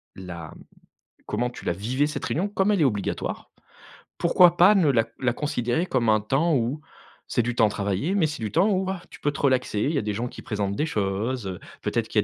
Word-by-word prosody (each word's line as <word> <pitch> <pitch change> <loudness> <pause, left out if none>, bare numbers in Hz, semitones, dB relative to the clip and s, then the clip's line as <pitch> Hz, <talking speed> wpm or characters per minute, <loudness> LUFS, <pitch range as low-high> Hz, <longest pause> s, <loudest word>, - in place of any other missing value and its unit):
la 85 -4 -8 0.7
comment 120 +4 -1
tu - - -11
la - - +1
vivais 125 +11 0
cette 150 - -4
réunion, 185 +7 -1
comme 200 0 +1
elle 200 -5 +2
est - - +5
obligatoire, 105 -8 -2 0.7
pourquoi 175 0 +5
pas 185 +4 +7
ne 175 -7 +4
la 115 -4 +3
la 125 -2 +1
considérer 125 +2 -1
comme 125 -9 0
un 110 -1 +4
temps 145 +9 +1
où 125 +4 0 0.5
c'est 120 - +2
du 120 - -1
temps 115 -3 +3
travaillé, 100 - -1
mais 190 -5 +3
c'est 150 -5 -4
du 110 -2 -3
temps 185 +6 +3
où, 190 -1 0
ah, 190 -2 -4
tu - - -12
peux 145 - 0
te 140 - -8
relaxer. 130 -6 +1
Il 140 - +1
y 140 - +1
a - - -1
des 105 -1 -2
gens 120 +4 -2
qui - - -10
présentent 100 -3 -2
des 155 +7 0
choses, 105 +2 -2
heu, 95 -2 -5 0.2
peut-être - - -1
qu'il - - -5
y - - +5
125 Hz, 235 wpm, -25 LUFS, 105-160 Hz, 0.7 s, pas